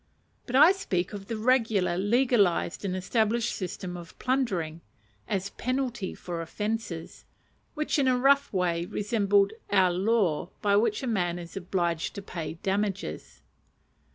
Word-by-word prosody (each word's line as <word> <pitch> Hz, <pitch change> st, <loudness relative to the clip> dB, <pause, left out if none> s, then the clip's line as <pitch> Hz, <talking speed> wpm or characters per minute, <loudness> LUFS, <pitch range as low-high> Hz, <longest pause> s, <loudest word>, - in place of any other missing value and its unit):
But 245 Hz, -, -3 dB
I 305 Hz, +6 st, +8 dB
speak 190 Hz, -, -2 dB
of 200 Hz, -1 st, -7 dB
the 230 Hz, -, -3 dB
regular 220 Hz, -6 st, +2 dB
legalized 205 Hz, -3 st, +2 dB
and 190 Hz, -2 st, -1 dB
established 220 Hz, +4 st, 0 dB
system 185 Hz, -1 st, -5 dB
of 175 Hz, 0 st, -10 dB
plundering, 185 Hz, -12 st, -1 dB, 0.5 s
as 195 Hz, 0 st, -2 dB
penalty 255 Hz, -6 st, -2 dB
for 170 Hz, -2 st, -5 dB
offences; 205 Hz, -1 st, -4 dB, 0.5 s
which 305 Hz, -1 st, 0 dB
in 270 Hz, -, +3 dB
a 255 Hz, -1 st, +3 dB
rough 280 Hz, +2 st, +4 dB
way 175 Hz, -3 st, 0 dB
resembled 200 Hz, 0 st, +2 dB, 0.2 s
our 190 Hz, -3 st, +4 dB
law 185 Hz, -4 st, +1 dB
by 200 Hz, -1 st, +2 dB
which 210 Hz, +2 st, +2 dB
a -, -, -1 dB
man 180 Hz, -7 st, 0 dB
is 170 Hz, -1 st, -9 dB
obliged 175 Hz, -3 st, -1 dB
to 200 Hz, -, -6 dB
pay 165 Hz, -4 st, -5 dB
"damages." 200 Hz, 0 st, -2 dB
200 Hz, 140 wpm, -28 LUFS, 180-235 Hz, 0.5 s, I